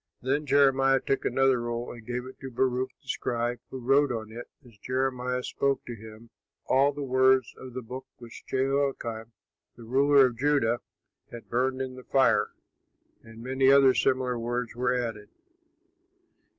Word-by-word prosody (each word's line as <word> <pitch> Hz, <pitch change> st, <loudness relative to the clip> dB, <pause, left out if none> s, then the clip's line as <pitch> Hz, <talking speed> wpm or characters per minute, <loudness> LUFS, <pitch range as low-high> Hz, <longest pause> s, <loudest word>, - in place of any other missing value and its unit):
Then 140 Hz, +4 st, -1 dB
Jeremiah 135 Hz, -1 st, +4 dB
took 135 Hz, -, -2 dB
another 135 Hz, -2 st, +2 dB
roll 120 Hz, 0 st, -4 dB
and 115 Hz, -2 st, -12 dB
gave 125 Hz, +2 st, -4 dB
it 130 Hz, -, -12 dB
to 135 Hz, -, -7 dB
Baruch, 130 Hz, +1 st, 0 dB
the -, -, -27 dB
scribe, 120 Hz, 0 st, -2 dB
who 130 Hz, -, -7 dB
wrote 135 Hz, +3 st, +2 dB
on 110 Hz, -2 st, -5 dB
it 120 Hz, +2 st, -9 dB, 0.2 s
as 120 Hz, -3 st, -17 dB
Jeremiah 125 Hz, 0 st, -2 dB
spoke 140 Hz, +1 st, -1 dB
to 120 Hz, -, -6 dB
him, 110 Hz, +1 st, -13 dB, 0.3 s
all 135 Hz, +2 st, +3 dB
the 145 Hz, 0 st, -6 dB
words 130 Hz, -1 st, +3 dB
of 130 Hz, -1 st, -10 dB
the 130 Hz, -, -5 dB
book 125 Hz, +3 st, -8 dB
which 120 Hz, -1 st, -12 dB
Jehoiakim, 130 Hz, -4 st, -1 dB, 0.4 s
the 120 Hz, -, -13 dB
ruler 135 Hz, +3 st, +4 dB
of 120 Hz, -2 st, -3 dB
Judah, 135 Hz, -5 st, +2 dB, 0.5 s
had 120 Hz, -, -11 dB
burned 130 Hz, +2 st, 0 dB
in 130 Hz, -1 st, -6 dB
the 130 Hz, -, -10 dB
fire; 135 Hz, +1 st, +2 dB, 0.7 s
and 115 Hz, 0 st, -13 dB
many 130 Hz, +1 st, +3 dB
other 135 Hz, -1 st, +6 dB
similar 130 Hz, -2 st, 0 dB
words 120 Hz, 0 st, -3 dB
were 125 Hz, 0 st, 0 dB
added. 115 Hz, -4 st, -3 dB
130 Hz, 165 wpm, -27 LUFS, 120-135 Hz, 0.7 s, other